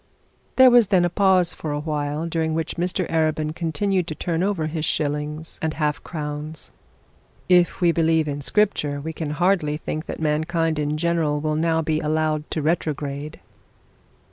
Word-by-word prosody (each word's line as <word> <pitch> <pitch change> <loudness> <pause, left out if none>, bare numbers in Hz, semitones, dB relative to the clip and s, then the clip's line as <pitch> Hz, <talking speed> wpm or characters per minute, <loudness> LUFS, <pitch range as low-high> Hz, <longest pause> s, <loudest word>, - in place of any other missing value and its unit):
There 260 -1 +8
was 240 -3 +6
then 185 -3 +3
a 175 - -1
pause 185 -2 +3
for 155 - -5
a 145 - -2
while, 150 0 -2
during 160 -1 -1
which 165 0 -2
Mr 180 +1 -1
Arabin 155 -1 0
continued 175 +3 0
to 155 - -4
turn 170 0 -2
over 190 -4 0
his 155 0 -3
shillings 150 +1 -2
and 160 -1 -2
half 150 0 -1
crowns. 150 -1 -6 0.8
'If 180 0 +3
we 175 -1 +5
believe 160 -1 +2
in 145 0 -3
Scripture, 150 -5 +1
we 160 +3 -5
can 155 -1 -4
hardly 155 -1 +1
think 155 0 -5
that - - -5
mankind 160 +1 0
in 150 +1 -1
general 160 -3 0
will 155 0 -1
now 160 +1 +1
be 155 0 0
allowed 155 0 -1
to 155 - -2
retrograde.' 150 -2 -2
160 Hz, 170 wpm, -23 LUFS, 150-170 Hz, 0.8 s, There